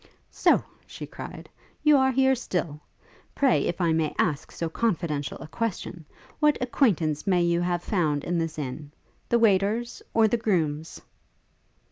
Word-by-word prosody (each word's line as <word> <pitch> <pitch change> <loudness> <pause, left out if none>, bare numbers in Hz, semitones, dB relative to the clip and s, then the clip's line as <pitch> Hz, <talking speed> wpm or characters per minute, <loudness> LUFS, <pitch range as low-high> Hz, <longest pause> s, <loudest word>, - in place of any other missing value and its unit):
'So!' - - +3 0.2
she - - -8
cried, - - -9 0.4
'you 300 -1 +6
are 265 -1 +4
here 265 +1 +3
still? 175 - -3 0.5
Pray, 275 -3 +3
if 175 - -2
I 170 -3 +2
may 160 -1 0
ask 155 -4 0
so 165 - -3
confidential 160 -7 -2
a - - -9
question, 180 -5 -4 0.3
what 300 -1 +4
acquaintance 195 - +1
may 180 -2 +3
you 170 0 +1
have 175 0 -1
found 155 -8 0
in 175 0 -1
this 165 -1 -3
inn? 145 +1 -5 0.4
The 235 - +4
waiters? 220 +2 +1
or 225 -1 +4
the 235 - +1
grooms?' 160 -8 -1
175 Hz, 150 wpm, -26 LUFS, 160-230 Hz, 0.5 s, you